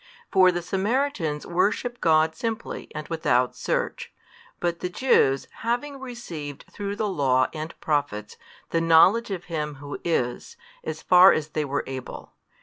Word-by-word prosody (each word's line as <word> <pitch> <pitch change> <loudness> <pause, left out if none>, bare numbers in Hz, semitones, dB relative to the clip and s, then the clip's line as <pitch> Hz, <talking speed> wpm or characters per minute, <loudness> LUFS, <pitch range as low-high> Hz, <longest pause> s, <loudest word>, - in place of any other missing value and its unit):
For 185 -2 +6
the 175 -1 -3
Samaritans 190 - -1
worship 210 +7 0
God 160 0 +4
simply 230 -1 -4
and 155 0 -5
without 125 -7 +1
search, - - -2 0.5
but 170 -1 -1
the 180 - -3
Jews 175 - +2
having 260 +5 -2
received 170 - -7
through 200 0 -4
the 210 +1 -1
Law 135 -8 +2
and 155 +1 -7
Prophets 145 -9 -2 0.4
the 165 - +1
knowledge 175 +8 +5
of 185 -3 -4
Him 150 -3 -4
Who 145 +1 -7
is, 160 - -2 0.3
as - - -5
far 180 +1 +8
as 155 -1 -2
they 155 -1 -2
were 140 +1 -2
able. 130 -1 -8
165 Hz, 145 wpm, -25 LUFS, 150-205 Hz, 0.5 s, far